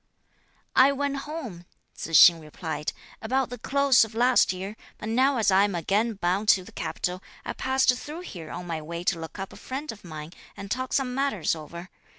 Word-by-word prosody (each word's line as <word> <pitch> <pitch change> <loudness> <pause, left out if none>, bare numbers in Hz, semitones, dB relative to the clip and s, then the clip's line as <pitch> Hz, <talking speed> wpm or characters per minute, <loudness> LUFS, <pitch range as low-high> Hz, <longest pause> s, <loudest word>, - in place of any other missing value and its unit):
"I 270 +1 +7
went 280 0 -1
home," 230 - -7 0.3
Tzu 165 - -7
hsing 170 0 +9
replied, 155 0 -4 0.3
"about 255 +2 0
the 245 - -6
close 275 -1 +4
of 220 0 -6
last 245 +2 +4
year, 190 +3 -6 0.2
but 215 - -6
now 260 +4 +3
as 220 -3 +3
I 190 +1 +5
am 200 -2 0
again 205 +7 0
bound 195 +3 0
to 195 -3 +5
the - - -13
capital, 180 +1 -3 0.2
I - - -3
passed 260 -1 +2
through 300 +6 -7
here 170 - -9
on 180 - -6
my 165 -2 -4
way 170 +2 -6
to 175 - 0
look 160 +3 -8
up 195 -1 -6
a - - -12
friend 280 +4 -5
of 220 - -13
mine 155 -1 -8 0.2
and 200 0 -8
talk 255 +1 -2
some 260 -2 0
matters 270 - 0
over. 170 +3 -8
210 Hz, 200 wpm, -26 LUFS, 175-260 Hz, 0.3 s, hsing